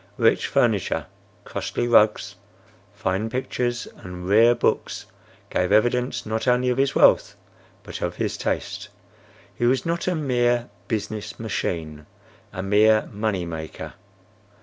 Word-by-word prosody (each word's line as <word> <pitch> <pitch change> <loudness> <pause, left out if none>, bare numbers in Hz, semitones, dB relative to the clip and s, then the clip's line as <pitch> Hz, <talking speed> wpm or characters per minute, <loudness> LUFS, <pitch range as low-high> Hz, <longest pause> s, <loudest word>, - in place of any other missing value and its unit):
Rich - - +3
furniture, - - +1 0.4
costly 120 - -3
rugs, 110 -2 +4 0.6
fine 95 +4 -2
pictures 120 -1 -2
and 90 -1 -8
rare 115 +4 +6
books, 120 - -1 0.5
gave 90 +1 0
evidence 120 +4 +2
not 110 +3 -2
only 125 0 +3
of 125 +1 0
his 135 0 +1
wealth - - +4 0.5
but - - -8
of - - -2
his - - -2
taste. - - -3 0.6
He 120 - 0
was 130 +1 +2
not 170 +1 -2
a 180 - +1
mere 120 -5 +1 0.2
business 110 -2 -4
machine, 80 -8 -3 0.4
a 90 - -5
mere 105 +2 +4
money 100 -4 -1
maker. 80 -2 -7
110 Hz, 125 wpm, -24 LUFS, 100-125 Hz, 0.6 s, rare